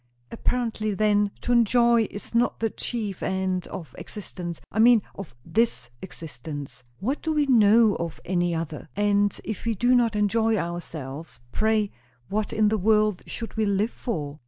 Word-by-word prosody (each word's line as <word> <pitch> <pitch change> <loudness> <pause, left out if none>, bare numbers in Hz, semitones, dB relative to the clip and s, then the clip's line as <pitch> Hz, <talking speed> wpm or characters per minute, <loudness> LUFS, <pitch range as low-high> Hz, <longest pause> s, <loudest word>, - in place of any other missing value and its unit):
"Apparently, 225 -3 -1
then, 205 0 +3
to - - -2
enjoy 235 -1 +4
is 205 - -9
not 235 0 +2
the 225 -1 0
chief 215 -6 -4
end 190 -1 -1
of 160 -9 -8
existence. 180 -5 -7
I 220 - -2
mean, 230 -2 +6
of 195 -10 -9
this 215 - 0
existence." 145 -6 -8 0.2
"What 255 +10 -2
do 320 - -1
we 300 -2 +2
know 225 -3 +5
of 170 -1 -5
any 175 -1 0
other? 160 -2 -5
And 205 0 +2
if 215 -2 -5
we 230 -1 0
do 245 +5 +3
not 235 -3 +3
enjoy 220 +2 +2
ourselves, 165 -4 -5
pray 215 +1 +1 0.4
what 210 +1 -1
in 215 -1 +3
the 215 0 0
world 215 -1 +3
should 230 - -6
we 220 -1 +1
live 200 +3 +1
for?" 150 - -4
210 Hz, 160 wpm, -25 LUFS, 175-225 Hz, 0.4 s, mean